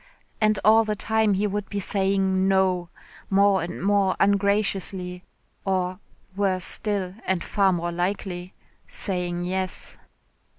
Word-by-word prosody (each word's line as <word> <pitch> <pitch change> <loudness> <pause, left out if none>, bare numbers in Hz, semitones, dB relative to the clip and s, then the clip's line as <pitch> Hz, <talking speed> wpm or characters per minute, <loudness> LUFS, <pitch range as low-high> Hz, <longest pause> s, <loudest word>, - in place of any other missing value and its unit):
And 215 -1 +3
all 220 +1 +7
the 215 -1 -2
time 220 -1 +1
he 200 +2 0
would 205 0 -3
be 205 - -3
saying 190 -1 +1
"No," 185 -2 +2 0.4
more 200 0 +4
and 175 +1 -5
more 200 -1 +2
ungraciously, 195 -2 +1 0.4
or, 185 -1 -1 0.4
worse 190 -3 0
still 200 -4 0
and 185 -3 0
far 195 -2 +2
more 175 -1 -1
likely 180 0 -3 0.3
saying 175 -3 -3
"yes." 185 +1 -4
190 Hz, 125 wpm, -24 LUFS, 180-205 Hz, 0.4 s, all